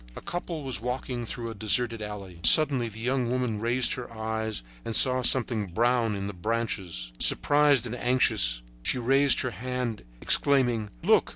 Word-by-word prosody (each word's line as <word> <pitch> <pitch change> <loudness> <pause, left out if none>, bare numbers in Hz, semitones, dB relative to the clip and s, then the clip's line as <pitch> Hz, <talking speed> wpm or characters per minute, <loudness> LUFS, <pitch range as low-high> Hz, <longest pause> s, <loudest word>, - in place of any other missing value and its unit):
A - - -9
couple 175 -2 -7
was 130 -7 -4
walking 125 -1 -5
through 115 0 -7
a - - -7
deserted 115 +2 -2
alley. 100 -4 -9
Suddenly 130 - +6
the 110 +1 -12
young 125 +1 -2
woman 125 -4 -3
raised 120 +3 +1
her 125 -2 -8
eyes 110 - -4 0.2
and 115 - -6
saw 130 -1 +4
something 120 -4 +2
brown 115 +3 -1
in 100 0 -6
the 100 - -6
branches. 95 - -4
Surprised 145 -4 +4
and 120 0 -6
anxious, 115 - +1 0.2
she - - -2
raised 135 +2 +4
her 125 - -4
hand, 125 +1 -5 0.2
exclaiming: 120 - +2
"Look! - - +2
120 Hz, 165 wpm, -25 LUFS, 110-130 Hz, 0.2 s, Suddenly